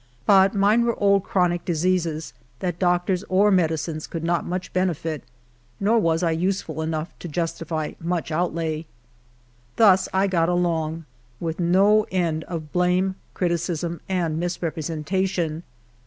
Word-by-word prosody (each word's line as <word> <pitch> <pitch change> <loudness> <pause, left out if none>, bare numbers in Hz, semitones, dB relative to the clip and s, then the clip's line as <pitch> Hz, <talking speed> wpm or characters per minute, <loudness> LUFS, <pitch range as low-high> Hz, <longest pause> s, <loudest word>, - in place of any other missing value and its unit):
But 195 0 +5
mine 205 +4 +4
were 235 0 -1
old 200 -1 +4
chronic 175 -3 +1
diseases 170 -2 -1 0.2
that 175 +3 -3
doctors 180 +1 +1
or 200 +3 +4
medicines 160 -3 0
could 165 -1 -5
not 170 0 0
much 180 +1 -4
beneiit, 165 -5 -1 0.6
nor 220 +4 +3
was 165 -3 +1
I 165 - +2
useful 180 0 -1
enough 160 0 -3
to 175 - -7
iustity 165 -1 -3
much 170 -1 -2
outlay. 160 -1 -1 0.9
Thus 190 -4 +5
I 190 +1 +2
got 170 -3 +1
along, 165 -2 0 0.3
with 165 0 -3
no 195 +5 +4
end 165 -4 -1
of 160 -4 -6
blame, 180 +1 +2 0.2
criticism, 170 -1 -1
and 170 -4 0
misrepresentation. 170 0 -2
175 Hz, 130 wpm, -23 LUFS, 160-185 Hz, 0.9 s, But